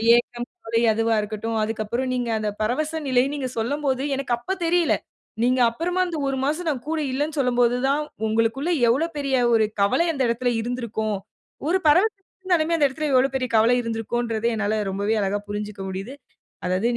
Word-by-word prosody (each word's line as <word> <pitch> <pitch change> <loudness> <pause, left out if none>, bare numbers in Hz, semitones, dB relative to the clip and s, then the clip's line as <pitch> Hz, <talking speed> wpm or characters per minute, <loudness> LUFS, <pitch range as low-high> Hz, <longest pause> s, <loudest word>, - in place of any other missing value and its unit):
ஏக்கம், 240 0 -1 0.2
கவலை 230 0 0
அதுவா 225 +1 +1
இருக்கட்டும். 215 +2 -4
அதுக்கப்பறம் 225 +4 -2
நீங்க 245 -1 -2
அந்த 215 -1 -1
பரவச 255 +8 0 0.2
நிலை, 250 -1 +4
நீங்க 280 -3 -2
சொல்லும் 280 +7 -1
போது 265 -1 +1
எனக்கு 270 -2 -2
அப்பத் 370 +10 -4
தெரியல. 340 0 +3 0.5
நீங்க 255 +1 +3
அப்பறமா 350 +9 -1
இந்த 340 -2 -4
1 270 0 -1
மாசம் 310 +5 -1
நான் 260 -5 -2
கூட 320 0 -1
இல்லைன்னு 295 +4 -2
சொல்லும்போது 245 -2 +2
தான் 285 +2 +1 0.2
உங்களுக்குள்ள 230 +8 0 0.2
எவ்வளவு 310 +7 +1
பெரிய 275 -2 0 0.2
ஒரு 220 -1 +4 0.2
கவலை 200 +12 +3
அந்த 275 - -3
இடத்தில 240 +1 0
இருந்திருக்கும். 225 -3 -2 0.5
ஒரு 375 +2 +3
பர 300 +2 +7 0.4
இருந்தாலுமே 345 -3 +1
அந்த 290 -3 +4
இடத்தில 305 +3 -3
எவ்வளவு 260 +1 +3
பெரிய 255 -1 -1
கவலை 230 +3 +5
இருந்திருக்கும்ன்றதை 230 0 -1
என்னால 215 0 0
ரொம்பவே 200 +3 0
அழகா 200 +1 0
புரிஞ்சுக்க 205 -1 -5
முடியுது. 195 +8 -6 0.5
அதாவது 185 +6 +1
245 Hz, 170 wpm, -23 LUFS, 225-290 Hz, 0.5 s, பர